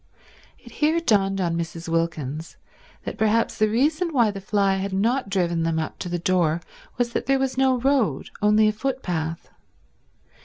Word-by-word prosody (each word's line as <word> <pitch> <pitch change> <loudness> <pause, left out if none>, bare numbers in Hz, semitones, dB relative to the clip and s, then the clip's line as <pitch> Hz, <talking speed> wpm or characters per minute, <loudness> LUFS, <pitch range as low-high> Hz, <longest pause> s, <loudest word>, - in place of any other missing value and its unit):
It - - -16
here 310 +2 +1
dawned 195 -10 +2
on 170 -3 0
Mrs. 165 0 -5
Wilkins 160 -2 -2 0.5
that - - -6
perhaps 220 +1 +1
the 215 0 +3
reason 305 - +1
why 240 -7 +3
the 195 -1 -7
fly 195 -1 +1
had 195 0 -3
not 230 +4 0
driven 175 -4 0
them 165 0 0
up 160 - -4
to 180 - -4
the 175 - -1
door 170 -2 +1 0.4
was 240 -1 -1
that - - -2
there 270 0 +3
was 265 -1 -1
no 265 -1 +3
road, 245 - 0
only 210 +1 +4
a - - +3
footpath. 180 -10 -3
200 Hz, 170 wpm, -24 LUFS, 170-250 Hz, 0.5 s, only